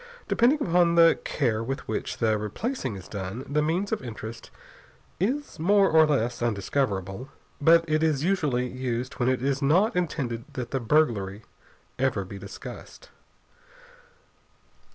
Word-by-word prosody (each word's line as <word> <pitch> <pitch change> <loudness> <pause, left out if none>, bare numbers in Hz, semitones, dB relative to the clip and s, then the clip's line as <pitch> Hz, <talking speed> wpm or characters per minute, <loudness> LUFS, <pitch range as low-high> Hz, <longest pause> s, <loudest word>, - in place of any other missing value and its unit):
Depending 270 +6 +3
upon 170 -1 +3
the 165 -1 +6
care 115 -6 0
with 135 +3 -5
which - - -3
the 110 -2 +2
replacing 120 - -3
is 95 - -10
done, 100 +5 -5
the 150 +2 +1
means 170 +6 -1
of 220 - -1
entrance 115 -2 -8 0.7
is 260 - -2
more 195 +4 +4
or 160 -1 +6
less 120 -5 0
undiscoverable. 105 0 -1 0.3
But 165 +2 +6
it 155 0 +1
is 155 -3 +1
usually 150 -9 +1
used 125 +1 -4
when 125 0 +2
it 130 -1 0
is 140 +1 0
not 175 +11 +3
intended 135 -10 -2
that 125 -2 -5
the 135 - 0
burglary 115 -6 +1 0.6
ever 125 -7 0
be 100 +1 -9
discussed. 100 - -10
135 Hz, 140 wpm, -26 LUFS, 115-165 Hz, 0.7 s, the